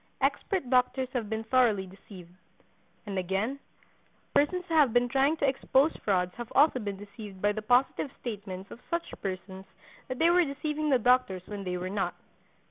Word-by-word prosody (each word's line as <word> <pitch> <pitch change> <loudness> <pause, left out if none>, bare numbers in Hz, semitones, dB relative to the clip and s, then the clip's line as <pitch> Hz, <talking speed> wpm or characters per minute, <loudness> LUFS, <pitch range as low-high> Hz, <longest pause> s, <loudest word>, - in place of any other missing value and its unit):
Expert 375 - 0
doctors 255 0 +2
have 230 -5 -2
been 220 0 -2
thoroughly 225 -5 +3
deceived. 185 -2 -13 0.7
And 195 -2 -2
again, 195 +9 -1 0.7
persons 360 +5 +2
who 330 - -4
have 295 -7 +5
been 245 0 +3
trying 275 +5 +2
to 285 - +1
expose 270 +2 +2
frauds 180 -3 +1
have 240 -1 -7
also 285 -2 +5
been 200 -3 -4
deceived 205 -1 -10
by 205 +2 +2
the 215 +1 -4
positive 245 +5 +2
statements 200 -4 -6
of - - -9
such 340 0 -2
persons 190 0 -5 0.4
that 255 - -4
they 330 +4 +4
were 355 0 +5
deceiving 300 +1 -2
the 265 - +5
doctors 245 -6 +2
when 205 -1 -6
they 180 0 -2
were 180 +1 -4
not. 195 +1 -2
235 Hz, 175 wpm, -29 LUFS, 195-275 Hz, 0.7 s, have